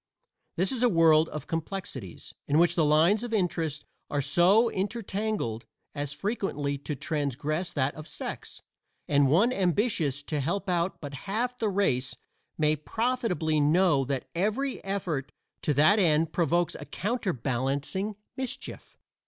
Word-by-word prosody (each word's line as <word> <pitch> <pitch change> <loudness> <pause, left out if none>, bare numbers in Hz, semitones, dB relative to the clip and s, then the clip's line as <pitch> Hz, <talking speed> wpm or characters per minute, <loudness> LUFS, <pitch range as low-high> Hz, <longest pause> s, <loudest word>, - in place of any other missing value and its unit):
This 185 +3 +1
is 255 -3 -2
a 245 - +5
world 165 -3 +5
of 150 - -6
complexities, 165 - -5
in 145 - +2
which 170 0 +4
the 170 - +2
lines 160 +8 +4
of 240 -2 -2
interest 165 -6 -1 0.2
are 145 - -1
so 175 - +4
intertangled 200 - -2 0.3
as 145 -1 -3
frequently 145 - -2
to 150 +1 -4
transgress 150 +4 -2
that 140 -1 0
of 155 +1 -10
sex; - - -6 0.4
and 140 -1 +4
one 205 - +4
ambitious 175 - 0
to 150 0 -2
help 175 +8 -1
but 170 -5 -2 0.2
half 240 +5 -1
the 220 - +1
race 135 -11 +1 0.4
may 155 -1 +3
profitably 180 - -1
know 150 -1 +4
that 135 0 -3
every 215 +10 -1
effort 180 -8 -3 0.3
to - - 0
that 155 +10 +5
end 160 -3 +3
provokes 170 +2 +1
a 145 - -7
counterbalancing 145 - -2 0.2
mischief. 260 -2 -6
165 Hz, 135 wpm, -28 LUFS, 145-200 Hz, 0.4 s, a